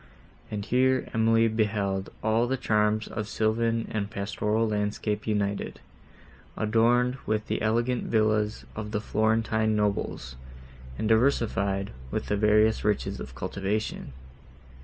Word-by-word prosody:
And 105 Hz, -1 st, -4 dB
here 130 Hz, +2 st, +2 dB
Emily 115 Hz, 0 st, +4 dB
beheld 100 Hz, -3 st, -1 dB
all 110 Hz, +2 st, +2 dB
the 135 Hz, +2 st, 0 dB
charms 105 Hz, -1 st, +1 dB
of 105 Hz, -1 st, -4 dB
sylvan 115 Hz, +1 st, 0 dB
and 100 Hz, -2 st, -2 dB
pastoral 105 Hz, +2 st, -1 dB
landscape 105 Hz, 0 st, -2 dB
united, 100 Hz, -2 st, -1 dB, 0.8 s
adorned 120 Hz, +4 st, +2 dB
with 110 Hz, 0 st, 0 dB
the -, -, -2 dB
elegant 120 Hz, +3 st, +1 dB
villas 110 Hz, -1 st, +1 dB
of 105 Hz, -1 st, -5 dB
the 105 Hz, -, +1 dB
Florentine 110 Hz, 0 st, +1 dB
nobles, 100 Hz, -11 st, -2 dB, 0.6 s
and 110 Hz, -, -1 dB
diversified 105 Hz, -5 st, +1 dB, 0.2 s
with -, -, -3 dB
the 105 Hz, -, +2 dB
various 105 Hz, +1 st, +3 dB
riches 105 Hz, -1 st, 0 dB
of 65 Hz, -, -8 dB
cultivation. 100 Hz, -4 st, -3 dB
110 Hz, 120 wpm, -27 LUFS, 105-115 Hz, 0.8 s, Emily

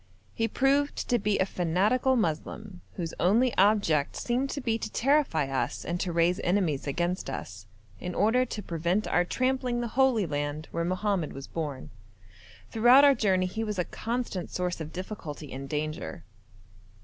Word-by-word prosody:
He 225 Hz, -, 0 dB
proved 280 Hz, +5 st, +2 dB
to 245 Hz, -, +3 dB
be 210 Hz, 0 st, +1 dB
a 190 Hz, -, +2 dB
fanatical 200 Hz, +10 st, +1 dB
Moslem, 185 Hz, 0 st, -3 dB
whose 165 Hz, -3 st, -4 dB
only 230 Hz, +7 st, +3 dB
object 190 Hz, -8 st, +3 dB
seemed 250 Hz, +3 st, -1 dB
to 285 Hz, -, -3 dB
be 230 Hz, -4 st, -1 dB
to 215 Hz, -, -5 dB
terrify 275 Hz, -, +2 dB
us 135 Hz, -1 st, -2 dB
and 175 Hz, +1 st, -2 dB
to 180 Hz, -, -1 dB
raise 170 Hz, +3 st, +2 dB
enemies 175 Hz, -7 st, 0 dB
against 175 Hz, +3 st, -1 dB
us, 100 Hz, -6 st, -7 dB, 0.3 s
in 180 Hz, 0 st, -5 dB
order 225 Hz, +5 st, +3 dB
to 220 Hz, -4 st, -5 dB
prevent 170 Hz, +5 st, -1 dB
our 175 Hz, -, +3 dB
trampling 255 Hz, +4 st, 0 dB
the 240 Hz, -1 st, -2 dB
holy 260 Hz, -6 st, +3 dB
land 145 Hz, 0 st, -3 dB
where 170 Hz, -, -1 dB
Mohammed 185 Hz, -1 st, -1 dB
was 135 Hz, 0 st, -7 dB
born. 150 Hz, -5 st, -5 dB, 0.8 s
Throughout 245 Hz, +5 st, +7 dB
our 280 Hz, -, +7 dB
journey 190 Hz, -7 st, +2 dB
he 220 Hz, +5 st, -3 dB
was 210 Hz, -2 st, -3 dB
a 180 Hz, -, 0 dB
constant 230 Hz, -6 st, -3 dB
source 180 Hz, -2 st, -3 dB
of 155 Hz, 0 st, -6 dB
difficulty 165 Hz, -6 st, -7 dB
and 135 Hz, +1 st, -7 dB
danger. 150 Hz, -, -4 dB
185 Hz, 165 wpm, -28 LUFS, 165-235 Hz, 0.8 s, Throughout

